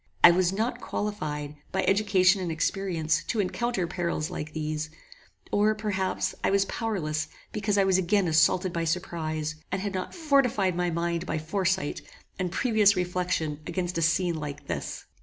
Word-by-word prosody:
I 175 - +11
was 180 0 +2
not 230 +5 -1
qualified, 150 -8 -3
by - - 0
education 195 -1 +4
and 175 -2 -2
experience, 160 -2 0
to 225 - -1
encounter 205 0 0
perils 170 -3 -2
like 155 +1 -5
these: 155 0 -3 0.6
or, 210 +1 +3
perhaps, 205 -3 -1
I - - +3
was 195 0 +3
powerless 175 -10 -2 0.2
because 205 -1 0
I 200 - +5
was 190 -1 +3
again 195 +1 +2
assaulted 175 +3 +3
by 170 - -1
surprize, 160 -2 -2 0.2
and 190 - 0
had 200 +1 -3
not 185 -1 -4
fortified 270 - +2
my 175 0 0
mind 170 +1 -1
by - - -1
foresight 185 +1 -1 0.4
and 180 -2 -1
previous 215 -3 +4
reflection 180 -4 -1
against 175 0 -2
a - - -1
scene 170 +1 +2
like 145 -1 -6
this. - - -4
180 Hz, 160 wpm, -27 LUFS, 160-200 Hz, 0.6 s, I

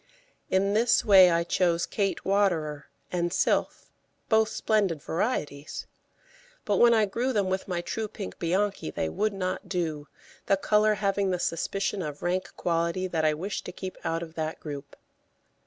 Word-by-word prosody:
In 195 +2 +2
this 235 +3 +3
way 190 -4 +8
I 170 0 +2
chose 170 -1 +1
Kate 200 -2 -2
Waterer 170 -7 +1 0.2
and 175 -1 0
Sylph, - - 0 0.4
both 220 -1 +4
splendid 200 -8 +1
varieties; 150 - -3 0.8
but - - +1
when 240 0 +6
I 220 -2 +4
grew 240 +6 -1
them 200 -5 0
with 190 0 -2
my 175 -2 -2
true 220 +4 -3
pink 95 - -8
Bianchi 190 - 0
they 80 - -2
would 215 - 0
not 185 -2 -4
do, 160 -5 -2 0.4
the 195 - +4
colour 210 +2 +3
having 200 -1 0
the 180 - 0
suspicion 195 +4 -1
of 150 -3 -6
rank 185 +1 -1
quality 170 +2 0
that 160 -3 -1
I 155 -1 +3
wished 190 +6 -4
to - - -5
keep 185 +1 -7
out 165 +1 -1
of 160 -1 -10
that 160 -1 -3
group. 145 -3 -8
185 Hz, 165 wpm, -27 LUFS, 165-205 Hz, 0.8 s, way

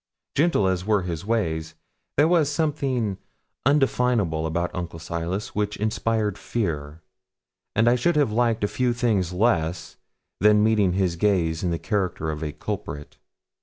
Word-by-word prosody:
Gentle 150 - +3
as 95 -1 0
were 105 -1 +1
his 90 +1 -5
ways, 80 -8 -1 0.4
there 145 +2 +5
was 165 -4 +3
something 135 - -1 0.5
undefinable 125 - +2
about 85 +2 -2
Uncle 85 -2 -5
Silas 85 +6 -4
which 105 0 -1
inspired 110 -1 -1
fear; 80 -8 -3 0.7
and 115 +1 +3
I 120 - +6
should 170 +8 +1
have 145 -7 +2
liked 115 -2 +1
few 120 +4 0
things 110 -8 +1
less 90 -5 0 0.4
than 105 0 +5
meeting 105 -4 +3
his 90 -2 0
gaze 85 -5 +1
in 90 - +1
the 85 - 0
character 90 -6 -1
of 75 0 -6
a 75 - -2
culprit. 75 0 -6
100 Hz, 145 wpm, -24 LUFS, 85-120 Hz, 0.7 s, I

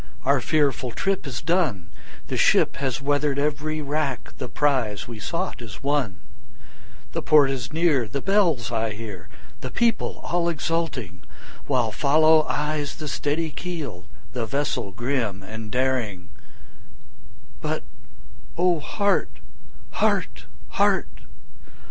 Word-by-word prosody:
our 135 -1 +4
fearful 140 -3 +1
trip 195 +6 -1
is 125 -4 -4
done, 155 - +1 0.4
The - - -3
ship - - +4
has 135 -1 -2
weather'd 145 0 +1
every 150 +1 -1
rack, 145 -3 -2
the - - -4
prize 125 -7 +1
we 115 -2 -7
sought 170 - -3
is 110 -1 -9
won, 135 - 0 0.9
The - - -2
port 145 -3 +6
is 125 -3 -4
near, 155 -7 +2
the 125 +7 -3
bells 165 - +2
I 110 -2 0
hear, 105 -4 -8 0.3
the 130 - -5
people 235 - +1
all 170 0 +1
exulting, 155 - -2 0.5
While 125 -5 +2
follow 155 +4 +5
eyes 150 -1 -1
the 155 - -6
steady 150 +3 -1
keel, 140 - -5 0.3
the 120 -3 -2
vessel 140 -6 -1
grim 115 -2 -2
and 110 +2 -7
daring; 120 -7 -1 1.3
But - - -2 0.7
O 175 -1 +3
heart! 200 +6 +1 0.6
heart! - - 0 0.2
heart! - - +2
140 Hz, 125 wpm, -24 LUFS, 115-155 Hz, 1.3 s, port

